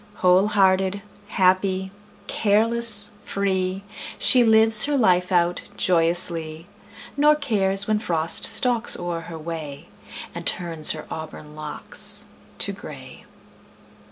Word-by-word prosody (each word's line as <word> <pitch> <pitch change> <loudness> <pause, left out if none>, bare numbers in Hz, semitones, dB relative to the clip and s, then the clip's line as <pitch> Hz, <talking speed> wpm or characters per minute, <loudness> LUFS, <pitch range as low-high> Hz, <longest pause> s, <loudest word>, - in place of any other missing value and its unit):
Whole 185 +1 +3
hearted, 195 -1 +1 0.2
happy, 190 0 0 0.3
careless, 220 0 +1
free, 190 -1 -2 0.3
She 250 -2 +5
lives 220 -1 +4
her 290 -1 -1
life 180 -6 +2
out 175 -1 +1 0.2
joyously, 165 -2 0 0.5
Nor 300 +2 +4
cares 200 -9 0
when 215 0 0
Frost 165 -5 -1
stalks 240 -2 +2
o'er 175 -1 -4
her 165 0 -9
way 155 -3 -8 0.4
And - - -7
turns 165 -3 +3
her 155 - -8
auburn 155 -1 -9
locks 155 -1 -4 0.3
to - - 0
gray. - - -12
190 Hz, 110 wpm, -22 LUFS, 170-215 Hz, 0.5 s, She